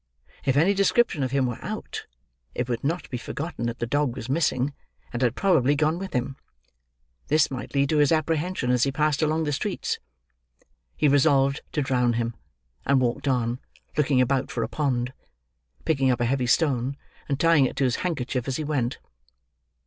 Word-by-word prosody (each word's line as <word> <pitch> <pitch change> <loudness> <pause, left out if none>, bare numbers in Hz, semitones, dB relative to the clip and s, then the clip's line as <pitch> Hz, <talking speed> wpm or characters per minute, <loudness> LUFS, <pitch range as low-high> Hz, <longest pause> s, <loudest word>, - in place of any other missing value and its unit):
If 135 0 +2
any 175 +7 +4
description 200 -3 +2
of 130 - 0
him 135 0 +1
were 120 -2 -4
out, - - -5 0.5
it 125 - -1
would 120 -2 -2
not 165 +6 -1
be 125 - -3
forgotten 140 -2 -4
that 115 0 -3
the 120 - -2
dog 140 0 0
was 125 -2 -7
missing, 140 -2 +1 0.4
and 120 - -3
had 125 -1 +2
probably 145 -8 +3
gone 155 +3 +1
with 190 -1 -6
him. 130 +1 -2 0.9
This 155 0 +3
might 130 +1 -6
lead 140 0 +2
to 155 - +2
his 145 -1 +4
apprehension 160 -3 0
as 125 -1 +2
he 135 - +3
passed 150 0 +1
along 155 +1 +1
the 150 - -1
streets. - - -2 1.0
He 150 - +3
resolved 140 0 +3
to 150 - +1
drown 125 -2 +2
him, 115 0 -1 0.5
and 140 -1 +3
walked 130 +3 -1
on, 125 -2 0 0.4
looking 145 -3 +2
about 130 +1 +1
for - - -2
a - - -2
pond: 130 -4 -1 0.7
picking 135 -5 +2
up 125 - +1
a 120 - +1
heavy 125 0 0
stone 135 -1 +1 0.3
and 140 -1 0
tying 165 -5 +5
it - - -3
to 140 - 0
his 125 -2 +1
handkerchief 130 -7 -2
as 135 - -1
he 155 - -3
went. 135 -5 -1
135 Hz, 185 wpm, -25 LUFS, 125-150 Hz, 1.0 s, tying